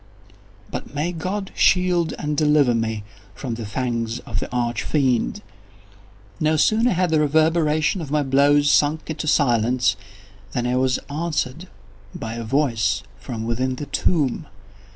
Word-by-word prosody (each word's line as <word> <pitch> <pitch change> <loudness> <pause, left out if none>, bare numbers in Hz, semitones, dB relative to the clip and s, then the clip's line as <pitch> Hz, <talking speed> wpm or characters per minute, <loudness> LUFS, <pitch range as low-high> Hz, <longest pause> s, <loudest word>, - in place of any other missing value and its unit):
But - - -6
may 155 +5 -1
God 185 +4 -4
shield 180 -2 +2
and 150 0 -2
deliver 150 -4 +3
me 110 -2 -2 0.3
from 130 -4 -4
the 115 -2 -5
fangs 115 0 -2
of 105 -3 -4
the - - -6
Arch 120 -1 -1
Fiend! 130 -5 0 1.0
No 155 0 +2
sooner 225 +9 +3
had 180 -1 +1
the 155 - +3
reverberation 155 +2 +2
of 150 - -6
my 150 0 +1
blows 145 +2 +4
sunk 155 +2 +2
into 155 0 -4
silence, 120 -6 +2 0.6
than 120 - -1
I 125 +1 0
was 130 0 +2
answered 155 +1 -3 0.5
by 115 0 -5
a 115 0 -5
voice 115 -6 +1 0.2
from 110 0 -5
within 130 +3 -1
the 145 - -6
tomb! 145 -4 0
140 Hz, 145 wpm, -22 LUFS, 120-155 Hz, 1.0 s, blows